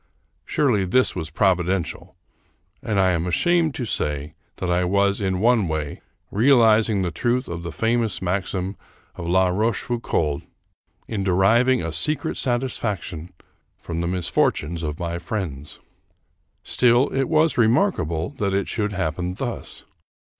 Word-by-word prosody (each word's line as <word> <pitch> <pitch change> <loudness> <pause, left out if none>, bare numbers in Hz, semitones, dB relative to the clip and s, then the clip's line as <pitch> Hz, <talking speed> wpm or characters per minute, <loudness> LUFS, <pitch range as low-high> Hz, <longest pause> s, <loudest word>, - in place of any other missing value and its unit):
Surely 125 -10 +1
this 125 +8 +3
was 80 -4 -4
providential, 90 0 0 0.7
and 110 -7 -1
I 95 -1 +4
am 85 0 -1
ashamed 165 - +2
to 125 - -3
say 75 -8 -2 0.2
that 90 - -3
I 90 +1 +2
was, 100 +3 +1
in 95 -2 0
one 115 -2 +3
way, 75 -2 -4 0.3
realizing 110 -3 +4
the 90 - -1
truth 120 - 0
of 85 0 -5
the 85 0 -5
famous 115 +1 0
maxim 95 +1 -2 0.4
of 85 - -7
La 95 +1 +3
Rochefoucauld 105 -7 -1 0.7
in 100 -3 -3
deriving 110 +6 +3
a 80 - -3
secret 115 - -1
satisfaction 105 - -2 0.5
from 85 0 -5
the 85 - -1
misfortunes 85 -2 0
of 75 -2 -3
my 85 -1 -3
friends. 80 -7 -5 0.8
Still, 125 +2 +3
it 135 0 0
was 155 -3 +2
remarkable 110 - +1
that 100 -2 0
it 100 - 0
should 105 -2 -2
happen 90 0 -2
thus. 120 +2 -6
95 Hz, 135 wpm, -23 LUFS, 85-120 Hz, 0.8 s, I